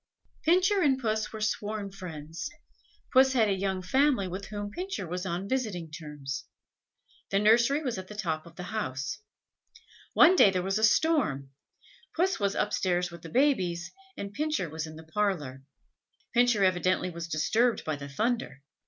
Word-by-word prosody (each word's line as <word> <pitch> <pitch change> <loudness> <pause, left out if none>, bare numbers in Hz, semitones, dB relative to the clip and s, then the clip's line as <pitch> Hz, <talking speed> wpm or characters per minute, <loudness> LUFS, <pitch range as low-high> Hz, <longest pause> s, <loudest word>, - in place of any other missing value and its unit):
Pincher 370 +4 +3
and 275 -5 +3
Puss 220 -3 -1
were 220 - -7
sworn 210 -1 -2
friends. 165 -4 -7 0.6
Puss 265 0 +6
had 230 -4 +4
a - - +3
young 190 -1 -2
family, 260 0 +2
with 190 +2 -5
whom 205 0 -5
Pincher 365 - -4
was 180 +2 -4
on 180 +2 -3
visiting 200 -10 -2
terms. 150 -4 -6 0.8
The 195 - +1
nursery 235 +8 +4
was 245 -8 -2
at 185 - -8
the 210 - -9
top 165 -6 -3
of 165 - -15
the 180 - -7
house. 150 -3 -3 0.9
One 365 - +7
day 210 - +7
there 185 -2 -1
was 195 +3 0
a - - -2
storm; 215 - +2 0.6
Puss 370 -1 +1
was 200 -1 0
upstairs 180 -4 0
with 170 -1 -10
the 165 - -9
babies, 185 - +1 0.3
and 200 0 -6
Pincher 300 - -1
was 160 0 -4
in 155 - -10
the 160 - -10
parlour. 160 -7 -2 0.7
Pincher 240 -4 +4
evidently 185 0 +2
was 170 0 -6
disturbed 220 +10 +1
by 155 - -1
the 140 0 -8
thunder. 220 - -2
195 Hz, 165 wpm, -29 LUFS, 170-235 Hz, 0.9 s, One